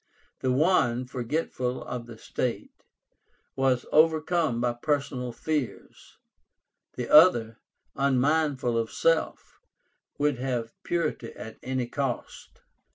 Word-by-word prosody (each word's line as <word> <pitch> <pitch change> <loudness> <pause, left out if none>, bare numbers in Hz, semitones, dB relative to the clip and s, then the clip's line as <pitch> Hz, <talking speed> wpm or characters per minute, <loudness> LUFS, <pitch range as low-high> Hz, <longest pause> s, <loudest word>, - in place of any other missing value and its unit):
The 130 - 0
one, 130 -4 +2
forgetful 125 0 -3
of 120 -1 -6
the 115 -2 -10
state, 120 +2 -4 0.7
was 130 -2 +1
overcome 155 -3 +3
by 120 0 +1
personal 130 -1 -2
fears; 145 +1 -5 0.8
the 125 -1 -4
other, 120 -9 +6 0.4
unmindful 140 -2 +1
of 115 -1 -2
self, 165 +9 0 0.6
would 145 -3 +1
have 120 -3 -2
purity 155 -9 -2
at 110 - -10
any 130 -1 -2
cost. 130 0 -5
130 Hz, 100 wpm, -27 LUFS, 120-150 Hz, 0.8 s, other